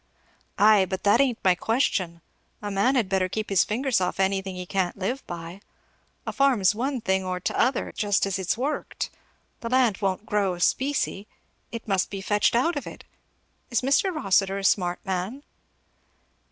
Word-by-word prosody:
"Ay, 210 Hz, -1 st, +6 dB
but 190 Hz, -1 st, -4 dB
that 205 Hz, +5 st, +5 dB
ain't 255 Hz, -4 st, +1 dB
my 185 Hz, -, +5 dB
question. 185 Hz, -5 st, -1 dB, 0.4 s
A 205 Hz, -1 st, -5 dB
man 200 Hz, +8 st, +2 dB
had 235 Hz, -6 st, +2 dB
better 190 Hz, -1 st, 0 dB
keep 215 Hz, +2 st, -4 dB
his 190 Hz, -2 st, +5 dB
fingers 245 Hz, -1 st, 0 dB
off 180 Hz, +1 st, -2 dB
anything 190 Hz, 0 st, 0 dB
he 180 Hz, 0 st, -6 dB
can't 185 Hz, -1 st, -1 dB
live 240 Hz, +8 st, -3 dB
by. 170 Hz, +2 st, -7 dB, 0.6 s
A -, -, -4 dB
farm's 245 Hz, -10 st, +3 dB
one 255 Hz, +3 st, -2 dB
thing 190 Hz, -1 st, 0 dB
or 185 Hz, -1 st, -3 dB
t'other, 250 Hz, +7 st, 0 dB
just 205 Hz, -2 st, +1 dB
as 195 Hz, -1 st, -2 dB
it's 190 Hz, +3 st, -1 dB
worked. 280 Hz, +5 st, -3 dB, 0.5 s
The 230 Hz, -, -5 dB
land 250 Hz, -5 st, +2 dB
won't 195 Hz, +1 st, -1 dB
grow 200 Hz, -4 st, 0 dB
specie 255 Hz, 0 st, 0 dB, 0.4 s
it 230 Hz, -1 st, -7 dB
must 195 Hz, -2 st, +1 dB
be 200 Hz, -, -5 dB
fetched 205 Hz, +3 st, +1 dB
out 285 Hz, +8 st, +2 dB
of 285 Hz, -, -4 dB
it. -, -, -10 dB, 0.7 s
Is 235 Hz, -, +1 dB
Mr. 280 Hz, +9 st, +2 dB
Rossitur 195 Hz, -, +1 dB
a 200 Hz, -, -5 dB
smart 180 Hz, -2 st, +2 dB
man?" 190 Hz, +9 st, -3 dB
200 Hz, 170 wpm, -25 LUFS, 190-240 Hz, 0.7 s, Ay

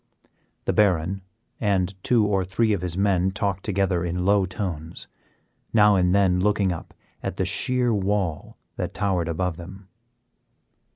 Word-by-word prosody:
The -, -, +1 dB
Baron 95 Hz, -2 st, +2 dB, 0.4 s
and 95 Hz, -2 st, +1 dB
two 115 Hz, -4 st, +3 dB
or 100 Hz, -2 st, +1 dB
three 105 Hz, +4 st, +1 dB
of 100 Hz, -, -1 dB
his 90 Hz, -1 st, -4 dB
men 95 Hz, -2 st, +2 dB
talked 100 Hz, -1 st, -2 dB
together 95 Hz, -3 st, 0 dB
in 90 Hz, +1 st, -2 dB
low 100 Hz, -1 st, +3 dB
tones, 85 Hz, -4 st, -5 dB, 0.7 s
now 105 Hz, -2 st, +6 dB
and 90 Hz, 0 st, +3 dB
then 95 Hz, -3 st, +3 dB
looking 100 Hz, -1 st, +2 dB
up 85 Hz, -, -7 dB, 0.3 s
at -, -, -4 dB
the -, -, 0 dB
sheer 125 Hz, -2 st, 0 dB
wall 95 Hz, -5 st, -1 dB, 0.2 s
that -, -, -4 dB
towered 95 Hz, -5 st, 0 dB
above 85 Hz, 0 st, -2 dB
them. 95 Hz, +2 st, -11 dB
95 Hz, 150 wpm, -24 LUFS, 90-100 Hz, 0.7 s, now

